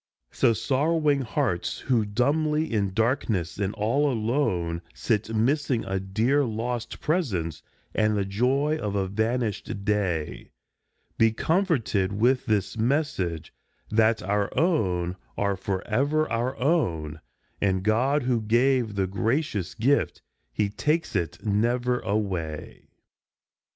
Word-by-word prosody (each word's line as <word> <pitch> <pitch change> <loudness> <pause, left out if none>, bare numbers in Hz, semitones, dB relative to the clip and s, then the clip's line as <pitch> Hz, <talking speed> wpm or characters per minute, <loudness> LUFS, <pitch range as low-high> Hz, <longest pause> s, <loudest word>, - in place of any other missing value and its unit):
So - - +3
sorrowing 145 +4 +1
hearts 120 - -1
who 120 -5 +1
dumbly 150 +7 +1
in 100 -3 +1
darkness 110 -5 0
and 100 -1 0
all 125 +7 +1
alone 110 -9 0
Sit 110 -1 -1
missing 130 +1 +1
a 95 0 -1
dear 110 +9 +1
lost 120 0 -3
presence 105 - -1 0.3
and 110 -1 +2
the 100 - 0
joy 130 +10 +1
of 105 -2 -2
a 95 -1 0
van 110 +6 0
ished 100 -2 -4
day, 95 -7 -1 0.7
Be 115 0 +5
comforted 120 - +1
with 125 +6 +2
this 105 -2 0
message 110 - -1 0.4
that 110 0 +3
our 100 +1 0
own 95 - +1 0.2
are 100 -1 +1
forever 125 +12 0
our 120 +4 -1
own, 80 - 0 0.4
And 95 -2 +1
God, 125 +7 +2
who 120 -2 +1
gave 120 0 +2
the 95 -1 +1
gracious 105 - -1
gift, 135 +5 +1 0.3
he 100 - 0
takes 150 +8 -1
it 85 +2 -2
never 120 +4 +1
away. 95 -7 -3
110 Hz, 120 wpm, -26 LUFS, 100-135 Hz, 0.7 s, Be